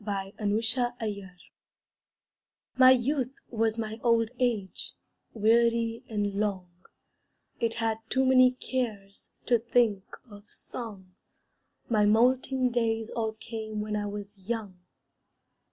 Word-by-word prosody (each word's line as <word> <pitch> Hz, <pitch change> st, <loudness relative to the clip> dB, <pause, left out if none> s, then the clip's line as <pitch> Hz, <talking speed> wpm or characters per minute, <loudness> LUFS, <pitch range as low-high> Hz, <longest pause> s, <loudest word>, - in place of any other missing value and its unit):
MY 195 Hz, -1 st, -4 dB, 0.7 s
YOUTH 200 Hz, -4 st, -4 dB, 1.5 s
My 255 Hz, 0 st, +8 dB
youth 260 Hz, +1 st, +2 dB, 0.2 s
was 225 Hz, -1 st, 0 dB
my 220 Hz, 0 st, -4 dB
old 230 Hz, -1 st, +2 dB
age, 225 Hz, -7 st, -2 dB, 0.4 s
Weary 230 Hz, +1 st, +2 dB
and 205 Hz, -2 st, -1 dB
long; 190 Hz, -4 st, -2 dB, 0.9 s
It 230 Hz, -1 st, 0 dB
had 225 Hz, -1 st, -1 dB
too 265 Hz, 0 st, +2 dB
many 255 Hz, -1 st, +6 dB
cares 220 Hz, -7 st, -4 dB, 0.2 s
To 240 Hz, -2 st, +3 dB
think 230 Hz, -3 st, +2 dB, 0.3 s
of 205 Hz, -1 st, -15 dB
song; 205 Hz, -6 st, -8 dB, 0.8 s
My 210 Hz, -3 st, +3 dB
moulting 255 Hz, +3 st, +3 dB
days 225 Hz, -2 st, 0 dB
all 220 Hz, -2 st, -2 dB
came 220 Hz, -1 st, -6 dB
When 210 Hz, 0 st, -2 dB
I 205 Hz, 0 st, -2 dB
was 205 Hz, 0 st, -7 dB
young. 210 Hz, -6 st, -3 dB
225 Hz, 110 wpm, -28 LUFS, 205-240 Hz, 1.5 s, My